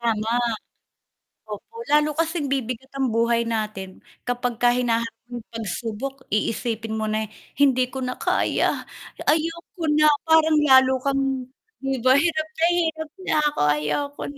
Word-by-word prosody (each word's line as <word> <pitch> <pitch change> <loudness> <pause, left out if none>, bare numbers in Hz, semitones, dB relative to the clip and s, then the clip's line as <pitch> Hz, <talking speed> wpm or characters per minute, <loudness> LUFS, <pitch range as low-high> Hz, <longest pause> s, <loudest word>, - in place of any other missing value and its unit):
Tama. 225 -1 0 1.2
Opo. 210 - -9 0.2
Lalo 300 0 +4
kasing 325 -2 0
bibigat 255 0 -3
ang 270 -1 +1
buhay 230 +1 +2
natin 215 -4 -3 0.4
kapag 245 0 -1
ka 245 - +6
hinaharap 230 -2 -1
ng 240 -2 -6
pagsubok 230 +5 -5
iisipin 225 0 -1
mo 220 - -1
na, 215 0 -1 0.3
"Hindi 260 -3 +3
ko 265 - -4
na 250 0 -3
kaya, - - +1 0.5
ayoko 330 +2 -1
na." 305 0 +5 0.2
parang 320 -1 +5
lalo 260 0 +7
kang 275 0 +1 0.6
'di 270 -1 -2
ba. 255 - +5
"Hirap 315 0 +1
na 325 - +3 0.2
hirap 315 -1 -2 0.2
na - - +2
ako. 295 - -7 0.2
Ayoko 280 - -3
na." - - -15
255 Hz, 140 wpm, -23 LUFS, 225-295 Hz, 1.2 s, lalo